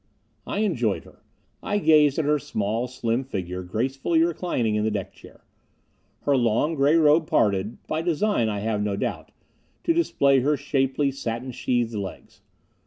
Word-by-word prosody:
I 205 - -2
enjoyed 120 - 0
her. - - -19 0.4
I 205 - -1
gazed 150 -6 +4
at 160 - 0
her 150 0 +2
small, 110 0 -2
slim 120 0 -2
figure 90 -8 -5
gracefully 135 - 0
reclining 165 -9 -1
in 105 0 0
the 110 - +1
deck 100 -3 -4
chair. - - -17 0.8
Her 145 - +2
long, 120 +5 +1
gray 145 +1 +3
robe 155 0 +4
parted 100 +1 +1
by 155 - -2
design, 170 - +1
I 105 -1 -3
have 105 -1 -1
no 105 -1 -1
doubt - - -4 0.5
to 335 - +2
display 140 - +3
her 145 +3 +1
shapely, 140 0 0
satin 125 -1 -4
sheathed 120 -1 -1
legs. 100 -3 -7
130 Hz, 160 wpm, -24 LUFS, 110-150 Hz, 0.8 s, gazed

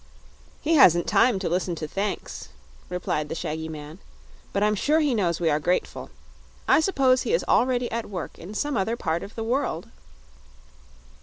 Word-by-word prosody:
"He 320 - +1
hasn't 175 - +6
time 240 -4 +3
to 190 - -3
listen 180 0 -1
to 155 -1 -5
thanks," 195 - -4 0.4
replied 155 -4 -2
the - - -3
shaggy 160 0 -4
man; 155 +2 -9 0.5
"but 200 - 0
I'm 210 0 +3
sure 295 +10 +2
he 295 -4 +2
knows 175 -7 0
we 165 -2 +2
are 150 - +2
grateful. 175 +4 -1 0.6
I - - +6
suppose 270 -7 +3
he - - -1
is - - +2
already 245 -1 +2
at 230 -1 -3
work 185 -4 -6
in 200 +5 -9
some 290 +4 -1
other 220 +2 0
part 160 -3 -1
of 200 - -9
the 225 - -3
world." 225 - -2
195 Hz, 175 wpm, -25 LUFS, 165-250 Hz, 0.6 s, hasn't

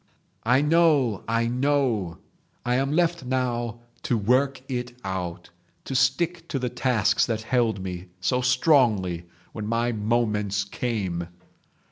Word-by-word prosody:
"I 125 +3 +5
know. 150 - +3
I 115 +1 +1
know. 125 - 0 0.5
I 120 - +1
am 135 +2 +1
left 170 0 +1
now 120 -2 -2 0.2
to 120 - 0
work 130 +5 +2
it 125 -2 -4
out, 90 -2 -4 0.3
to - - -5
stick 165 +6 +1
to 145 - -2
the 125 -2 -1
tasks 115 -5 +2
that 110 -2 -2
held 110 -5 +1
me 90 -1 -6
so 125 +8 +1
strongly 120 - +3 0.3
when 105 -1 -5
my 115 +2 +1
moments 105 -2 0
came. 100 -6 -3
120 Hz, 130 wpm, -25 LUFS, 105-130 Hz, 0.5 s, I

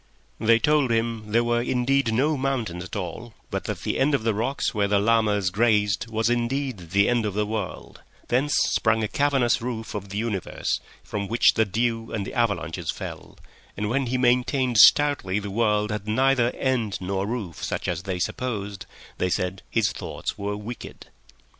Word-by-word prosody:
They 115 +1 +5
told 145 +2 +2
him 115 -2 -1
there 115 +2 +3
were 120 0 +1
indeed 125 0 +1
no 140 +7 +2
mountains 125 -10 -2
at 90 - -8
all, 105 +4 -6 0.2
but - - -3
that - - -4
the - - -2
end 140 +2 +3
of 130 - -2
the 115 -1 +1
rocks 115 +7 -1
where 105 -2 +1
the 100 0 +2
llamas 105 -3 +2
grazed 105 0 +2
was 110 0 0
indeed 120 -5 -1
the 100 +3 +3
end 120 -2 +2
of 105 -2 -3
the 105 0 +1
world; 105 -3 -5 0.3
thence 135 +4 +1
sprang 110 0 +1
a - - 0
cavernous 135 -2 +2
roof 115 -2 -4
of 100 -2 -5
the 100 - -5
universe, 105 -4 -2 0.2
from 100 -1 -4
which 115 +3 +4
the 110 - +2
dew 115 +2 -1
and 100 -3 -2
the - - -7
avalanches 90 -8 -1
fell; - - -6 0.4
and 105 +1 -2
when 135 0 0
he 130 +2 0
maintained 125 -1 +2
stoutly 140 -8 +5
the 105 -1 -4
world 105 -1 +1
had 105 -1 -4
neither 130 +2 +3
end 120 -6 0
nor 95 +1 -2
roof 105 -8 -5
such - - -3
as 85 -1 -1
they 95 -1 -3
supposed, 100 0 -3 0.3
they 90 - +1
said 90 +1 -2
his - - +1
thoughts - - -5
were 100 0 -3
wicked. 115 +4 -9
110 Hz, 185 wpm, -25 LUFS, 100-120 Hz, 0.4 s, They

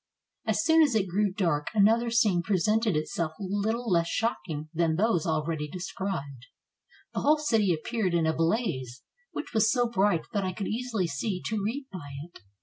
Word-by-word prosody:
As - - +1
soon 320 0 +6
as 290 -7 +3
it 200 -3 +2
grew 200 +3 +1
dark, 165 -7 0
another 225 +3 +4
scene 215 -6 +3
presented 210 +2 +1
itself 155 +1 -2
little 205 +5 -1
less 170 -4 +2
shocking 155 - -2
than 165 -1 +1
those 185 -3 +1
already 155 -1 -1
described; 170 -6 -5 0.7
the - - -1
whole 300 +2 +4
city 225 -10 +2
appeared 185 +3 -1
in 165 -1 +2
a 160 - +2
blaze, 160 - -1 0.3
which - - -6
was 220 0 +4
so 245 -2 +2
bright 200 -6 +2
that 200 -2 0
I 185 -1 -2
could 200 +2 -4
easily 225 -4 -1
see 175 +5 -2
to 215 -1 -1
read 255 +7 -2
by 145 -7 -8
it. 170 +2 -14
190 Hz, 175 wpm, -28 LUFS, 165-225 Hz, 0.7 s, soon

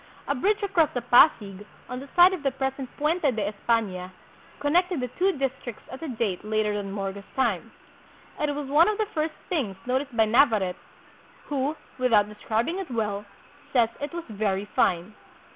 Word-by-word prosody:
A - - +2
bridge 410 - +1
across 345 -7 +3
the 245 - 0
Pasig, 210 -7 +4 0.2
on 250 - -5
the 275 +1 -10
site 355 +1 +8
of 365 - -4
the 280 - +2
present 265 0 -3
Puente 315 +5 +1
de 220 -5 -1
Espana, 200 -4 -1 0.5
connected 350 +3 +2
the 250 -1 -2
two 375 - +1
districts 265 -4 -4
at 260 - -8
a 325 - -4
date 220 -8 -2
later 215 0 0
than 200 -1 -3
^Morga's 195 0 -4
time. 235 -9 0 0.7
It 295 -1 0
was 290 -1 -4
one 300 +5 +5
of 425 - -1
the 435 - +1
first 310 -1 -1
things 255 - -1
noticed 260 0 -2
by 220 - +5
Navarrete, 215 -6 +3 0.7
who, 285 +1 0 0.2
without 225 -5 +4
describing 225 - -2
it 385 - -5
well, 210 -4 -2 0.5
says 235 -4 +4
it 290 - -4
was 340 -1 -6
very 205 -3 -1
fine. 180 -1 +1
250 Hz, 175 wpm, -26 LUFS, 210-300 Hz, 0.7 s, site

